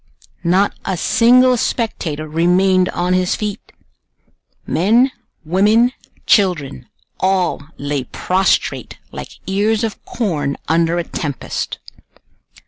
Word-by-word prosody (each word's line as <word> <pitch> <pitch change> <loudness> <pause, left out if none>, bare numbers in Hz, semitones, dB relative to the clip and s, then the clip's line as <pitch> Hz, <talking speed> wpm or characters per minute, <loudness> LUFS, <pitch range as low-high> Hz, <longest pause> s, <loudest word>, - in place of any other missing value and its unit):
Not 185 +4 +2
a 190 - -2
single 250 +6 +4
spectator 160 - -2
remained 180 +4 +2
on 180 +1 -1
his 185 -1 +1
feet! 210 -1 -5 0.9
Men, 230 +9 +3 0.3
women 210 +8 +3 0.3
children, 165 - +1 0.3
all 185 -4 +1 0.2
lay 140 -2 -3
prostrate 185 +8 0
like - - -8
ears 210 +3 +1
of 220 -2 -4
corn 160 - -2
under 165 +1 +2
a 175 - 0
tempest. 145 -4 -4
185 Hz, 100 wpm, -18 LUFS, 165-215 Hz, 0.9 s, single